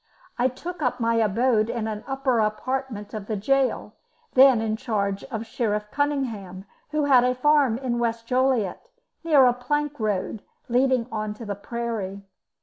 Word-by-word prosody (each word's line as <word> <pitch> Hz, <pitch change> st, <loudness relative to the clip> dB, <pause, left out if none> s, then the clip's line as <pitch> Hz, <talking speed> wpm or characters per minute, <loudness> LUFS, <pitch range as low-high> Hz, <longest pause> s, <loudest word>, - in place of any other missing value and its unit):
I 250 Hz, -, +4 dB
took 330 Hz, +7 st, -7 dB
up 250 Hz, -2 st, 0 dB
my 230 Hz, 0 st, +1 dB
abode 225 Hz, +1 st, +2 dB
in 230 Hz, -2 st, -2 dB
an 215 Hz, 0 st, -5 dB
upper 270 Hz, -3 st, 0 dB
apartment 215 Hz, 0 st, -2 dB
of 210 Hz, -2 st, -6 dB
the 220 Hz, -, -2 dB
gaol, 270 Hz, +6 st, 0 dB, 0.4 s
then 260 Hz, -2 st, +7 dB
in 220 Hz, -1 st, -1 dB
charge 205 Hz, -5 st, -2 dB
of 225 Hz, -4 st, -5 dB
Sheriff 210 Hz, -2 st, -2 dB
Cunningham, 230 Hz, -11 st, -2 dB, 0.2 s
who 300 Hz, -1 st, 0 dB
had 260 Hz, -4 st, +6 dB
a 250 Hz, 0 st, +2 dB
farm 280 Hz, -3 st, +3 dB
in 245 Hz, -2 st, -2 dB
West 230 Hz, -1 st, -1 dB
Joliet, 250 Hz, -5 st, +1 dB, 0.4 s
near 300 Hz, -5 st, +6 dB
a 245 Hz, -, +5 dB
plank 295 Hz, +3 st, -2 dB
road, 210 Hz, -1 st, -2 dB, 0.3 s
leading 250 Hz, 0 st, +2 dB
on 215 Hz, -1 st, -3 dB
to 230 Hz, -, -9 dB
the 205 Hz, -, -3 dB
prairie. 205 Hz, -2 st, -5 dB
235 Hz, 160 wpm, -24 LUFS, 215-265 Hz, 0.4 s, then